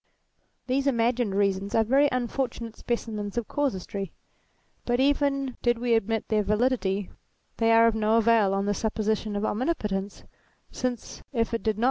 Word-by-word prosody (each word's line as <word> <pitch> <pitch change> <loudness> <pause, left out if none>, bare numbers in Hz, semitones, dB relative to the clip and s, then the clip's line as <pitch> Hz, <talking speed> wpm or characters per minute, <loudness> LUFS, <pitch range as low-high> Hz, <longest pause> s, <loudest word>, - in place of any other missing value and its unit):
These 270 +2 0
imagined 235 -4 +1
reasons 200 0 0
are 225 - +4
very 275 +6 +3
unfortunate 240 -2 -3
specimens 215 -3 -4
of 235 - -1
casuistry; 200 - -2 0.7
but 240 0 0
even 275 -1 +1
did 240 -1 +2
we 240 0 0
admit 225 0 0
their 215 -1 +2
validity, 205 -2 0 0.5
they 225 0 +3
are 230 0 +6
of 230 - +4
no 220 +1 +2
avail 225 -3 +4
on 195 0 0
the 205 - +1
supposition 215 0 -1
of 205 +1 -1
omnipotence, 210 -7 -2 0.5
since 250 -3 -4
if 230 -1 0
it 230 - -1
did 220 -2 0
not. - - -7
225 Hz, 155 wpm, -26 LUFS, 205-245 Hz, 0.7 s, are